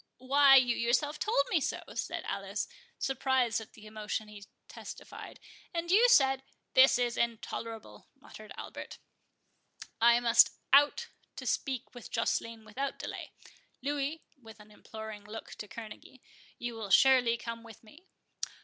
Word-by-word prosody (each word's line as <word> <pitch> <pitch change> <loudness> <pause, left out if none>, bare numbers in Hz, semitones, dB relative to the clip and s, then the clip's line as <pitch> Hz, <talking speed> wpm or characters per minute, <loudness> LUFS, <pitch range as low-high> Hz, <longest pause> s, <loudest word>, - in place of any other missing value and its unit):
"Why, 275 +2 +6
you 250 -3 +5
yourself 250 +6 0
told 425 -10 +2
me 340 -5 +3
so," - - -2
said - - -4
Alice, - - -3 0.3
surprised 265 -4 0
at 220 - -13
the 215 - -15
emotion 215 0 -4
he 205 -1 -12 0.2
testified; - - -10 0.4
"and 340 +1 -2
you 460 +6 +6
said"— 270 - +5 0.3
"This 260 0 +7
is 245 -1 -1
intolerable," 230 -1 -4
muttered - - -13
Albert; - - -8 1.0
"I 235 +1 +6
must 235 -1 +5 0.2
out 290 +12 +5 0.3
to - - -8
speak 260 -3 -2
with 245 -2 -10
Joceline 230 -1 -2
without 265 +6 -4
delay—Louis," 290 +3 -6 0.2
(with 220 -2 -14
an 210 0 -16
imploring 220 0 -9
look 215 +2 -9
to 210 - -8
Kerneguy,) 225 +4 -10 0.4
"you 240 0 -4
will 220 -3 -6
surely 250 0 +5
come 230 -1 -6
with 225 -1 -14
me?" 300 - -18
240 Hz, 140 wpm, -31 LUFS, 225-275 Hz, 1.0 s, This